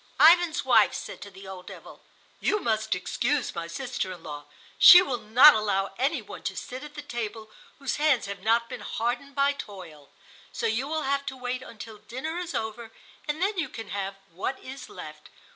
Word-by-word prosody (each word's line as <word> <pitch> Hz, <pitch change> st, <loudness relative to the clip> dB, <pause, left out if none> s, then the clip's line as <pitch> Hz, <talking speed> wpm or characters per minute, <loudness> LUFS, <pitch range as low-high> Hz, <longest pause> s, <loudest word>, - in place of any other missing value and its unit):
Ivan's 340 Hz, 0 st, +6 dB
wife -, -, +5 dB
said -, -, -7 dB
to 200 Hz, -, -8 dB
the 195 Hz, 0 st, -13 dB
old 185 Hz, -1 st, -9 dB
devil: -, -, -11 dB, 0.4 s
"You 420 Hz, -, +1 dB
must 220 Hz, -, 0 dB
excuse 245 Hz, +9 st, -1 dB
my 170 Hz, -1 st, -5 dB
sister 245 Hz, 0 st, -4 dB
in 175 Hz, -3 st, -10 dB
law; 145 Hz, -2 st, -7 dB, 0.3 s
she 355 Hz, -, +11 dB
will 255 Hz, -9 st, -3 dB
not 240 Hz, +8 st, +8 dB
allow 200 Hz, -2 st, 0 dB
any 275 Hz, -1 st, 0 dB
one -, -, -10 dB
to 190 Hz, -, -2 dB
sit 255 Hz, +3 st, -6 dB
at 300 Hz, 0 st, -11 dB
the 295 Hz, -, -7 dB
table 225 Hz, -4 st, -5 dB, 0.3 s
whose 275 Hz, -3 st, -3 dB
hands 295 Hz, -4 st, +3 dB
have 200 Hz, -1 st, -6 dB
not 230 Hz, +3 st, +2 dB
been -, -, -7 dB
hardened 245 Hz, +5 st, -3 dB
by 280 Hz, 0 st, +3 dB
toil, 180 Hz, -, -10 dB, 0.4 s
so -, -, -4 dB
you 230 Hz, +4 st, 0 dB
will 315 Hz, 0 st, -2 dB
have 280 Hz, +1 st, 0 dB
to 265 Hz, -, -4 dB
wait 250 Hz, 0 st, -3 dB
until 225 Hz, -3 st, -10 dB
the -, -, -31 dB
dinner 310 Hz, +8 st, -4 dB
is 350 Hz, -1 st, -5 dB
over 220 Hz, +1 st, -4 dB, 0.4 s
and 305 Hz, +4 st, -1 dB
then 400 Hz, -1 st, 0 dB
you 310 Hz, -5 st, -1 dB
can 225 Hz, -4 st, -8 dB
have 195 Hz, 0 st, -3 dB, 0.2 s
what 195 Hz, +10 st, -4 dB
is 260 Hz, 0 st, -9 dB
left. 155 Hz, 0 st, -10 dB
235 Hz, 200 wpm, -27 LUFS, 200-280 Hz, 0.4 s, she